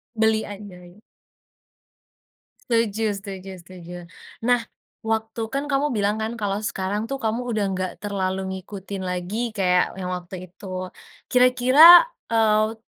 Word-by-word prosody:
Beli 220 0 +2
aja, 205 -2 -9
iya. 175 +4 -17 1.7
Setuju 225 -2 +1
setuju 195 -1 -8
setuju. 175 -1 -11 0.5
Nah 245 +1 +3 0.4
waktu 220 0 -3
kan 275 +5 -3
kamu 280 +2 +2
bilang 210 +1 0
kan 220 +2 -3
kalau 205 -3 -2
sekarang 210 -1 -3
tuh 275 - -3
kamu 230 +3 -1
udah 215 -3 -1 0.2
gak 185 -1 -2
terlalu 190 -2 -2 0.2
ngikutin 195 0 -7
lagi 200 +6 -3
kayak 180 -2 +1
yang 185 -1 -5
waktu 180 0 -7
itu. 185 -1 -7 0.4
Kira-kira, 255 - +8 0.2
eee, 220 -1 +2
210 Hz, 125 wpm, -23 LUFS, 185-230 Hz, 1.7 s, Kira-kira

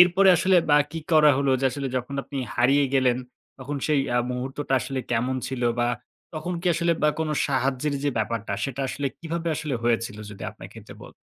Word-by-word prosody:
এরপরে 180 +2 +6
আসলে 185 +2 +3
বা 145 - +7
কি 165 - -5
করা 150 -1 +7
হলো 140 -1 +1
যে - - -1
আসলে 140 +1 -4
যখন 130 +3 -3
আপনি 140 - -6 0.2
হারিয়ে 135 +4 +4
গেলেন। 130 -2 +3 0.4
তখন 140 +3 -5
সেই 150 -3 +3 0.2
আ - - +4
মুহূর্তটা 135 +3 -4
আসলে 135 -1 -3
কেমন 125 +3 0
ছিল 130 -2 -4 0.2
বা 120 - +2 0.5
তখন 155 +3 -3
কি 180 - -6
আসলে 170 +1 +2
বা 150 - +5
কোন 160 -1 -1 0.2
সাহায্যের 135 +1 0
যে 145 - +2
ব্যাপারটা 115 0 -2
সেটা 135 -1 -4
আসলে 140 +1 -2
কিভাবে 170 0 -3
আসলে 150 -4 -3
হয়েছিল 115 -1 0
যদি 100 - -10
আপনার - - -11
ক্ষেত্রে - - -12
বলতে - - -13
140 Hz, 195 wpm, -25 LUFS, 125-155 Hz, 0.5 s, বা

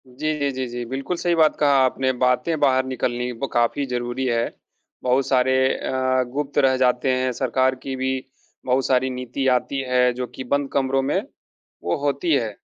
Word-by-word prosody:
जी, 150 +5 -2
जी, 140 -1 0
जी, 130 0 -3
जी। 120 0 -5
बिल्कुल, 135 +7 -3
सही 175 0 +1
बात 160 -2 +4
कहा 145 - +4 0.2
आपने, 130 0 0
बातें 125 +5 +1
बाहर 130 -2 +3
निकलनी 125 -1 -2
ब 135 - 0
काफ़ी 120 +4 +1
ज़रूरी 125 0 -3
है। 120 -2 0 0.5
बहुत 130 +1 +2
सारे 130 0 +3 0.2
अ, 130 0 0
गुप्त 145 0 -3
रह 135 -2 +4
जाते 125 0 +2
हैं, 130 0 +1
सरकार 130 +1 +1
की 135 - -4
भी 130 0 -2 0.4
बहुत 130 0 +1
सारी 130 0 +2
नीति 125 +1 -4
आती 135 +2 -4
है 125 0 +3
जो 125 0 -4
कि - - -5
बंद 140 -1 0
कमरों 135 -1 +1
में 135 +2 0 0.6
वो 85 - 0
होती 140 +4 0
है। 120 -6 +1
130 Hz, 185 wpm, -22 LUFS, 125-135 Hz, 0.6 s, बात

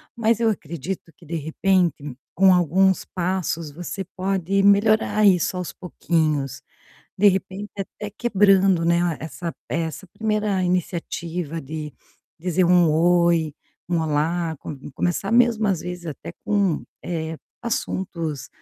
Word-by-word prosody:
mas 230 -1 +2
eu 230 - +2
acredito 170 -1 -5
que, - - -17
de 165 - -5
repente, 160 -3 0 0.2
com 190 0 +6
alguns 185 +2 +3
passos, 175 -4 -2
você 175 +5 -5
pode 190 0 0
melhorar 210 +1 +4
isso 185 -1 +3
aos 180 -2 -4
pouquinhos. 155 -6 -1 0.6
De 205 +1 +7
repente 195 +2 -2
até 205 +1 -5
quebrando, 195 -5 +3
né, 170 -1 +2
essa 165 +2 -5
essa 160 +2 -3
1ª 210 -1 -1
iniciativa 170 -2 -2
de 150 +1 -6 0.5
dizer 180 +2 +1
um 175 -2 +5
"oi", 170 -1 +3 0.3
um 175 -2 +1
"olá", 160 +1 0
co - - -8 0.2
começar 175 +6 -1
mesmo 235 -2 +4
às 190 -5 +1
vezes 180 -1 -6
até 160 +2 -7
com, 200 -6 +1 0.2
eh, 160 -2 -3 0.3
assuntos 170 - -3
175 Hz, 125 wpm, -23 LUFS, 165-195 Hz, 0.6 s, De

